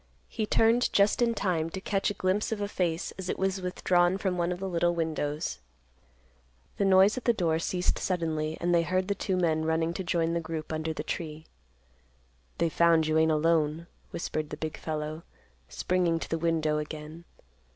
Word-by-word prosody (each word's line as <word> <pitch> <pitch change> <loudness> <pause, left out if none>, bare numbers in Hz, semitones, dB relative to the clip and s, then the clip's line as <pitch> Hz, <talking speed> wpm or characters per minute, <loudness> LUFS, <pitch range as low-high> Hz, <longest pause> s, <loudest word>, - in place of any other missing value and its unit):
He 215 - -2
turned 230 +3 +3
just 200 +4 +3
in 235 -1 +2
time 170 -6 0
to 190 - -5
catch 195 0 0
a 205 - -4
glimpse 190 +4 0
of 220 - -2
a 205 - -1
face 175 -4 -1
as 185 -1 -5
it - - -1
was 190 0 -1
withdrawn 180 0 +2
from 190 -2 -1
one 175 0 0
of 180 - -3
the 195 - -3
little 175 -1 +1
windows. 150 - -2 1.2
The 200 - +1
noise 195 +5 +5
at - - -22
the 235 - +4
door 165 -6 +1
ceased 180 +2 -1
suddenly, 160 -3 -1
and 175 +1 +1
they 170 - +5
heard 185 +3 -1
the - - +3
two 190 -2 -2
men 160 -3 +1
running 160 +1 0
to 190 - -4
join 170 -2 0
the 170 - +1
group 160 -1 -5
under 155 +1 -2
the 150 - -4
tree. 155 -1 -5 1.1
"They've 165 -2 0
found 165 -2 +4
you 155 0 +2
ain't 160 0 +4
alone," 155 0 +1 0.2
whispered 155 -2 -3
the 150 - -6
big 155 0 -4
fellow, 155 0 -4 0.5
springing 170 - +1
to - - -6
the 165 - 0
window 160 -2 +1
again. 150 +2 -7
170 Hz, 195 wpm, -28 LUFS, 160-185 Hz, 1.2 s, noise